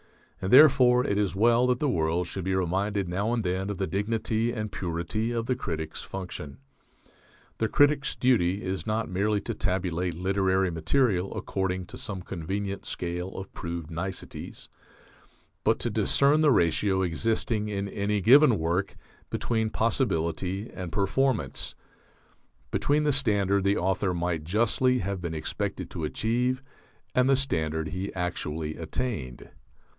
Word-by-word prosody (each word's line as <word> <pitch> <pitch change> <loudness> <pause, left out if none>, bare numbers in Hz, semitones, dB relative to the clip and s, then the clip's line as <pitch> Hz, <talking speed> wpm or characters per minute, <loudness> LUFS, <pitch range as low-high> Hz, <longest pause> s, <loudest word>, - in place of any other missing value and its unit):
And 95 - -2
therefore 130 -3 +7
it 100 - 0
is 100 -2 0
well 120 +4 +4
that 125 -1 +2
the 150 - 0
world 85 - +1
should 95 +2 -5
be 95 +1 0
reminded 95 +2 0
now 100 +6 -1
and 120 -2 0
then 95 +1 -1
of 100 - -3
the 95 - 0
dignity 110 +3 -1
and 110 -3 -4
purity 90 +6 -2
of 115 -1 -1
the 130 +1 0
critic's 80 -9 -4
function. 75 -7 -7 1.0
The 110 - +2
critic's 145 +2 +3
duty 105 -6 +2
is 95 +3 -3
not 110 0 0
merely 100 +3 +1
to 115 - -3
tabulate 90 -4 -1
literary 95 0 +1
material 95 - +1
according 95 -1 -2
to - - -10
some 95 -3 -4
convenient 95 +3 -4
scale 90 +2 -3
of 95 0 -8
proved 85 -2 -5
niceties; 95 +3 -6 1.0
but - - +3
to - - -2
discern 145 +3 +3
the 155 - +5
ratio 95 - +2
existing 105 +4 0
in 100 -1 -2
any 100 +1 -1
given 130 +2 +7
work 85 +4 -1 0.3
between 110 -2 -1
possibility 95 - -1
and 90 -3 -6
performance; 105 - 0 1.0
between 150 +1 +2
the 150 - +3
standard 100 -7 +2
the 100 +1 +2
author 95 0 0
might 85 -2 -2
justly 120 +7 +2
have 100 -4 -3
been 85 -2 -4
expected 75 - -4
to 80 - -4
achieve 125 - 0 0.5
and 125 +1 +3
the 135 - +6
standard 80 - -1
he 95 +4 -4
actually 80 -3 -3
attained. 80 - -4
100 Hz, 145 wpm, -27 LUFS, 90-115 Hz, 1.0 s, therefore